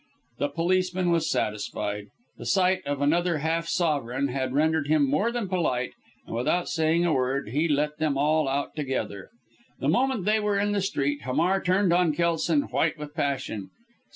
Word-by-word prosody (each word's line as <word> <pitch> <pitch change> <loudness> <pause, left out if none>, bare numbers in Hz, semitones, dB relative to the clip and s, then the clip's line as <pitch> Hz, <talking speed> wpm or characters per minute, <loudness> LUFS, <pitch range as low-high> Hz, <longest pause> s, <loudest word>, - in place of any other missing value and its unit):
The 145 - 0
policeman 180 +1 +1
was 165 -2 +1
satisfied. 105 -1 -2 0.3
The - - -6
sight 185 -1 +3
of 145 0 -1
another 170 +3 +2
half 165 +2 -1
sovereign 140 -6 0
had 130 0 -2
rendered 155 +1 +1
him 150 -2 +3
more 175 - +1
than 235 -4 -2
polite, 160 -10 -1 0.3
and, - - -6
without 150 +9 0
saying 165 +1 +1
a 170 - +2
word, 130 -2 0
he 150 +8 +1
let 150 0 0
them 155 -3 +1
all 150 +1 +2
out 140 +1 -2
together. 130 -9 -3 0.5
The - - 0
moment 255 -6 +1
they 215 +1 +3
were 210 -1 0
in 205 +1 +1
the 205 -1 0
street, 145 -7 -1
Hamar 165 +10 +1
turned 185 0 +2
on 175 -3 +3
Kelson, 165 -2 +1
white 140 +5 0
with 150 -1 -8
passion. 135 - -2
155 Hz, 175 wpm, -26 LUFS, 140-180 Hz, 0.5 s, sight